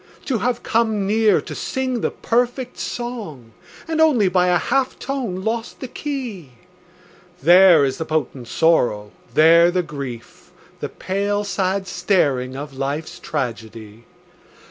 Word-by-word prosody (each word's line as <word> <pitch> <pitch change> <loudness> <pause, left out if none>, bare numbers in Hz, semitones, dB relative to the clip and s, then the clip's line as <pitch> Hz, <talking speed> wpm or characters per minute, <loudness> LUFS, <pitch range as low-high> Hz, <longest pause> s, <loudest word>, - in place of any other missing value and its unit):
To 255 -5 -1
have 240 +3 -1
come 220 -3 +1
near 215 0 +3
to - - -8
sing 260 -3 -2
the - - +1
perfect 245 +2 -1
song 210 - -6 0.4
And 320 -1 0
only 250 -12 +4
by 180 0 +2
a 180 0 +4
half 265 +9 0
tone 240 -10 -4
lost 225 +2 -3
the 260 - -6
key, 240 - -6 0.9
There 175 -3 +7
is 135 - -3
the 160 - -2
potent 150 -6 -3
sorrow, 115 -10 +1 0.2
there 165 +2 +6
the 180 0 0
grief, 135 -7 -9 0.3
The - - -4
pale, 200 +2 -2
sad 190 0 -1
staring 135 -10 0
of 145 +1 -7
life's 140 +4 -4
tragedy. 115 -5 -6
185 Hz, 135 wpm, -21 LUFS, 145-230 Hz, 0.9 s, There